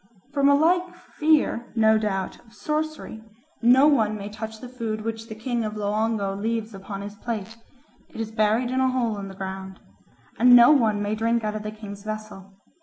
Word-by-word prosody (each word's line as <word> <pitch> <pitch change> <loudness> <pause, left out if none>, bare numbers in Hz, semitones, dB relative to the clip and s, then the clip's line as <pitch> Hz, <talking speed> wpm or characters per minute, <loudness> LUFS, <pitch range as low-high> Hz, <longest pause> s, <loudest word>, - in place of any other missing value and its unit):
From 280 -1 +3
a 285 - +6
like 355 +4 +2 0.2
fear, 300 -6 +2
no 220 -1 +4
doubt, 195 -3 -3
of 230 -1 -22
sorcery, 305 -7 -4 0.4
no 250 +4 +6
one 220 -8 +3
may 200 0 -6
touch 220 +1 -7
the 250 - -8
food 230 -4 -4
which 225 0 -5
the 220 - -8
king 235 +1 -2
of 215 0 -4
Loango 210 -1 -1
leaves 225 +2 -3
upon 195 +1 -7
his 205 0 -7
plate; 225 0 -5 0.5
it - - -11
is 220 -1 -3
buried 220 +3 +1
in 260 - 0
a 260 0 +3
hole 235 -5 -1
in 195 - -6
the 195 - -10
ground. 190 0 -7 0.6
And 245 +1 +8
no 240 +3 +8
one 220 -8 +3
may 205 +1 -1
drink 230 +1 0
out 210 0 -1
of 215 - -4
the 215 - -5
king's 210 -2 -9
vessel. 215 -3 -7
220 Hz, 195 wpm, -24 LUFS, 210-245 Hz, 0.6 s, And